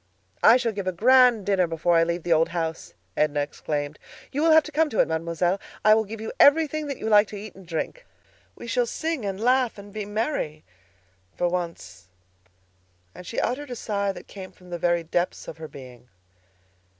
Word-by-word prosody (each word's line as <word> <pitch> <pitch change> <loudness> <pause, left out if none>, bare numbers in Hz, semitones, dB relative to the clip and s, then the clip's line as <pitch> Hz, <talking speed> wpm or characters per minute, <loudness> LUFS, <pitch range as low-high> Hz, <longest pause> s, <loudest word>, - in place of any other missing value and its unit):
"I 230 - +7
shall 240 -3 -1
give 200 -3 -5
a - - +2
grand 245 +2 +5
dinner 190 -3 +2
before 165 +1 +1
I 165 - +5
leave 170 0 -2
the 175 - +2
old 165 +1 +3
house!" 165 -1 -4 0.2
Edna 150 -1 +1
exclaimed. 145 0 -4 0.3
"You 285 - -2
will 325 - +4
have 315 -1 +7
to 305 - -9
come 310 +1 +2
to 220 - -3
it, - - +4
Mademoiselle. 170 +3 -1 0.3
I 215 - +8
will 220 0 +2
give 220 +2 -8
you 220 - -5
everything 310 0 +4
that 280 - -4
you - - -5
like 210 -1 +5
to 210 - -9
eat 210 0 -9
and 190 -2 -15
to - - -19
drink. - - -4 0.5
We - - -10
shall - - 0
sing 320 - -3
and 195 -1 -3
laugh 250 0 +2
and 200 0 -12
be 215 -1 -4
merry 205 - -3 0.7
for 175 - 0
once." 165 - -5 1.1
And 180 - -11
she - - -3
uttered 280 +4 -2
a 245 - -5
sigh 200 -3 -2
that - - -10
came 190 -2 -10
from 180 -1 -18
the 175 - -4
very 175 0 +1
depths 175 +2 -2
of - - -8
her 160 - -7
being. 125 -4 -13
195 Hz, 210 wpm, -25 LUFS, 165-240 Hz, 1.1 s, I